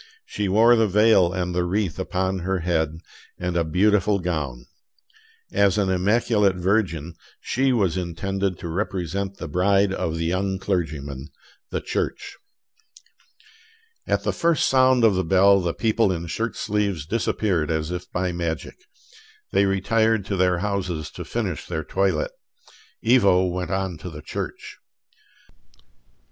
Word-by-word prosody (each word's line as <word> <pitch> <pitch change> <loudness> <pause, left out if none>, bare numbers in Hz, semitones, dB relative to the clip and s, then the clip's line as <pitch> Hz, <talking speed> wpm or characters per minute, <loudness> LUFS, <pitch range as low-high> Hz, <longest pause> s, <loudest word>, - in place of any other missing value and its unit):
She 100 -2 -3
wore 115 +5 +6
the 115 -1 +3
veil 100 -3 +4
and 90 -1 -2
the 90 0 +1
wreath 95 0 -1
upon 95 0 -1
her 95 +1 -2
head, 80 -2 -1 0.4
and 90 -1 -3
a 85 - +2
beautiful 100 +4 +2
gown. 75 -10 -3 0.9
As 100 0 +3
an 100 -2 +1
immaculate 105 +1 +2
virgin, 90 -4 0 0.3
she 135 +1 0
was 100 -8 +1
intended 95 +2 -2
to - - -7
represent 95 +1 -3
the 85 - -6
bride 95 +4 +2
of 80 -4 -2
the 80 - -2
young 95 +3 -1
clergyman, 75 -8 -3 0.4
the - - -3
Church. - - -3 1.7
At - - 0
the - - 0
first 170 -3 +2
sound 130 -2 +4
of 110 -3 +5
the 95 0 0
bell 95 +3 +5
the 85 -1 -1
people 110 +1 +1
in 85 -2 -3
shirt 115 +7 -3
sleeves 100 -7 -1
disappeared 95 -4 0
as 80 0 -1
if 90 0 -6
by 90 0 -1
magic. 85 -2 -4 0.7
They 100 +1 +3
retired 110 +2 +1
to 100 - -2
their 90 -1 +2
houses 90 -6 -3
to - - -7
finish - - -3
their 80 - -3
toilet: 100 - 0 0.8
Ivo 100 -7 +5
went 90 0 -3
on 95 -4 -2
to 90 - -7
the 75 -2 -10
church. - - -6
95 Hz, 145 wpm, -23 LUFS, 85-100 Hz, 1.7 s, wore